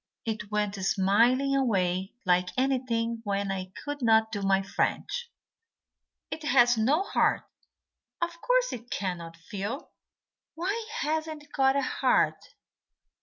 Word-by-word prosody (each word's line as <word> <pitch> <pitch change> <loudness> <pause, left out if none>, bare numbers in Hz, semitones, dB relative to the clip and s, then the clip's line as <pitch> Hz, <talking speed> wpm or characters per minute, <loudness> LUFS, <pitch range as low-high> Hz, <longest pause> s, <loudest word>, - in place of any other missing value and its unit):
It 220 -2 -3
went 210 -1 0
smiling 235 +9 +3
away 190 -7 0
like 180 0 +3
anything 240 -3 0
when 200 -1 -1
I 185 -1 -4
could 290 -1 -4
not 220 -1 +4
do 205 -2 -3
my 195 0 +2
French." 480 - -2 1.0
"It 310 +1 -4
has 245 -3 +5
no 270 - +2
heart. - - +1 0.8
Of 340 0 -3
course - - +2
it 240 0 -8
can't 170 -4 -4
feel." 200 - -6 0.6
"Why 400 +7 -2
hasn't 315 0 -2
it 290 - -22
got 270 -1 +3
a 280 - +1
heart?" - - +2
235 Hz, 125 wpm, -28 LUFS, 195-290 Hz, 1.0 s, has